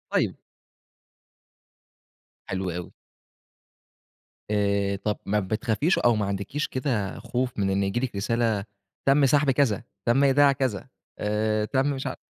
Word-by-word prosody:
طيب. -, -, +1 dB, 2.1 s
حلو 95 Hz, -1 st, -2 dB
أوي. 90 Hz, +1 st, -6 dB, 1.6 s
آآ 100 Hz, -1 st, +1 dB
طب 105 Hz, +1 st, -2 dB
ما 105 Hz, +1 st, +1 dB
بتخافيش 110 Hz, -, 0 dB
أو 120 Hz, -1 st, +4 dB
ما 105 Hz, -1 st, 0 dB
عندكيش 100 Hz, +10 st, -2 dB
كده 125 Hz, -7 st, -2 dB
خوف 125 Hz, -2 st, -3 dB
من 100 Hz, -1 st, +1 dB
إن 95 Hz, +1 st, +1 dB
ييجي 100 Hz, +5 st, 0 dB
لِك 130 Hz, -5 st, -3 dB
رسالة 110 Hz, 0 st, 0 dB, 0.4 s
تم 140 Hz, +1 st, +5 dB
سحب 145 Hz, +1 st, +3 dB
كذا، 130 Hz, -7 st, +2 dB, 0.2 s
تم 135 Hz, +4 st, +4 dB
إيداع 140 Hz, +1 st, +5 dB
كذا، 130 Hz, -4 st, -2 dB, 0.3 s
آآ 105 Hz, +1 st, 0 dB
تم 130 Hz, +5 st, +1 dB
مش 135 Hz, -1 st, -3 dB
عارف -, -, -4 dB
110 Hz, 130 wpm, -26 LUFS, 100-135 Hz, 2.1 s, تم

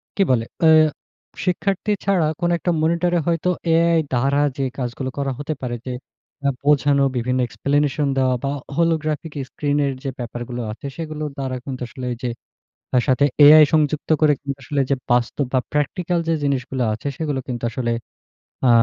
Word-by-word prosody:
কি 200 Hz, -, 0 dB
বলে? 115 Hz, -2 st, +2 dB, 0.2 s
এ্যাঁ 155 Hz, -1 st, +7 dB, 0.6 s
শিক্ষার্থী 195 Hz, +3 st, 0 dB
ছাড়া 185 Hz, -6 st, +2 dB
কোন 175 Hz, -1 st, +1 dB
একটা 175 Hz, -, -1 dB
মনিটরে 170 Hz, +2 st, +2 dB
হয়তো 170 Hz, +1 st, +1 dB, 0.2 s
এআই 165 Hz, 0 st, +4 dB
দ্বারা 140 Hz, +4 st, +2 dB, 0.2 s
যে, 135 Hz, -, 0 dB
কাজগুলো 130 Hz, +1 st, -3 dB
করা 140 Hz, -1 st, -1 dB
হতে 150 Hz, +2 st, -2 dB
পারে 120 Hz, -1 st, -3 dB
যে, 130 Hz, -, -4 dB, 0.5 s
এ্যাঁ 140 Hz, -1 st, +1 dB
বোঝানো 145 Hz, -1 st, +3 dB
বিভিন্ন 125 Hz, +2 st, 0 dB
explanation 145 Hz, +5 st, 0 dB
দেওয়া 130 Hz, -1 st, +2 dB
বা, 140 Hz, -, 0 dB, 0.2 s
holographic 160 Hz, -2 st, 0 dB, 0.2 s
screen 145 Hz, 0 st, -1 dB
এর 135 Hz, -, -1 dB
যে, 135 Hz, -, -2 dB
ব্যাপার 120 Hz, 0 st, -5 dB
গুলো 120 Hz, 0 st, -4 dB
আছে, 115 Hz, -, -10 dB
সেগুলোর 155 Hz, -2 st, -4 dB
দ্বারা 130 Hz, -1 st, -3 dB
কিন্তু 130 Hz, -2 st, -6 dB
আসলে 130 Hz, -4 st, -7 dB
ঐযে 120 Hz, 0 st, -4 dB, 0.6 s
তার 125 Hz, -2 st, +4 dB
সাথে 130 Hz, +2 st, +3 dB, 0.2 s
এআই 155 Hz, +1 st, +10 dB
সংযুক্ত 155 Hz, 0 st, +1 dB
করে 150 Hz, -1 st, +5 dB
কিন্তু 140 Hz, -1 st, -4 dB
আসলে 145 Hz, +2 st, -3 dB
ওইযে 135 Hz, +1 st, 0 dB
বাস্তব 120 Hz, +3 st, +1 dB
বা, 130 Hz, -, +3 dB
practical 170 Hz, +4 st, 0 dB
যে, 165 Hz, -, +3 dB
জিনিসগুলো 130 Hz, -2 st, -1 dB
আছে, 110 Hz, +6 st, -6 dB
সেগুলো 145 Hz, -4 st, -2 dB
কিন্তু 120 Hz, -2 st, -4 dB
আসলে 120 Hz, -1 st, -2 dB, 0.7 s
আ -, -, +5 dB
140 Hz, 170 wpm, -21 LUFS, 130-155 Hz, 0.7 s, এআই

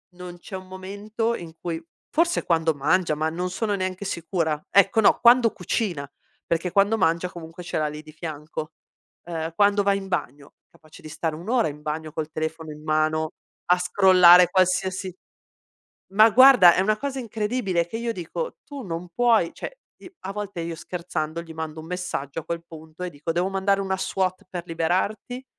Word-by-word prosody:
non 180 Hz, 0 st, -9 dB
c'è 190 Hz, +2 st, -7 dB
un 185 Hz, 0 st, -11 dB
momento 205 Hz, +5 st, -3 dB
in 165 Hz, -5 st, -9 dB
cui 165 Hz, -1 st, -4 dB, 0.3 s
forse 335 Hz, +2 st, +1 dB
quando 165 Hz, -1 st, +2 dB
mangia, 155 Hz, +3 st, +1 dB
ma 155 Hz, +1 st, 0 dB
non 180 Hz, +3 st, -3 dB
sono 205 Hz, +3 st, -1 dB
neanche 185 Hz, 0 st, -3 dB
sicura; 165 Hz, -4 st, -2 dB
ecco, 200 Hz, +2 st, +4 dB
no, 220 Hz, -, +5 dB
quando 235 Hz, -1 st, +6 dB
cucina! 180 Hz, -4 st, -2 dB, 0.5 s
Perché 170 Hz, +1 st, 0 dB
quando 200 Hz, +3 st, +3 dB
mangia 170 Hz, -1 st, +1 dB
comunque 170 Hz, 0 st, -10 dB
ce 175 Hz, -, -3 dB
l'ha 155 Hz, -1 st, +1 dB
lì 150 Hz, 0 st, -6 dB
di 155 Hz, -, -13 dB
fianco, 155 Hz, 0 st, -7 dB, 0.5 s
ehm, 165 Hz, -1 st, -4 dB
quando 205 Hz, +2 st, +3 dB
va 200 Hz, 0 st, +3 dB
in 195 Hz, -1 st, -4 dB
bagno, 145 Hz, -5 st, -4 dB
capace 155 Hz, -2 st, -18 dB
di -, -, -10 dB
stare 160 Hz, 0 st, -3 dB
1 170 Hz, +5 st, -10 dB
ora 235 Hz, -5 st, +2 dB
in 150 Hz, +1 st, -10 dB
bagno 155 Hz, +1 st, -4 dB
col 155 Hz, 0 st, -4 dB
telefono 160 Hz, 0 st, -4 dB
in 150 Hz, 0 st, -11 dB
mano 155 Hz, 0 st, +1 dB, 0.4 s
a 180 Hz, -, +6 dB
scrollare 180 Hz, -1 st, +7 dB
qualsiasi 185 Hz, 0 st, +1 dB, 1.0 s
ma, 215 Hz, +2 st, +8 dB
guarda, 245 Hz, -6 st, +8 dB
è -, -, +2 dB
una 210 Hz, +3 st, +2 dB
cosa 275 Hz, 0 st, -3 dB
incredibile 215 Hz, -5 st, -1 dB
e -, -, -7 dB
che 200 Hz, -, -6 dB
io 235 Hz, 0 st, -2 dB
dico: 225 Hz, -, -5 dB
"Tu 285 Hz, -2 st, -8 dB
non 175 Hz, -3 st, -5 dB
puoi" 230 Hz, -8 st, +3 dB
cioè, -, -, -8 dB, 0.2 s
i 365 Hz, -, -13 dB
a 195 Hz, -, -4 dB
volte, 200 Hz, -3 st, -5 dB
io 165 Hz, 0 st, -4 dB
scherzando, 170 Hz, -1 st, -4 dB
gli 165 Hz, -1 st, -11 dB
mando 160 Hz, -1 st, -5 dB
un 160 Hz, -, -11 dB
messaggio 170 Hz, -5 st, -4 dB
a -, -, -15 dB
quel 170 Hz, 0 st, -4 dB
punto 160 Hz, +2 st, -10 dB
e 180 Hz, -, -4 dB
dico: 150 Hz, +1 st, -6 dB
"Devo 175 Hz, +3 st, 0 dB
mandare 195 Hz, +1 st, +1 dB
una 190 Hz, -1 st, -1 dB
SWAT 185 Hz, +1 st, -2 dB
per 175 Hz, -2 st, -5 dB
liberarti? 185 Hz, +10 st, -2 dB
180 Hz, 190 wpm, -24 LUFS, 160-200 Hz, 1.0 s, ma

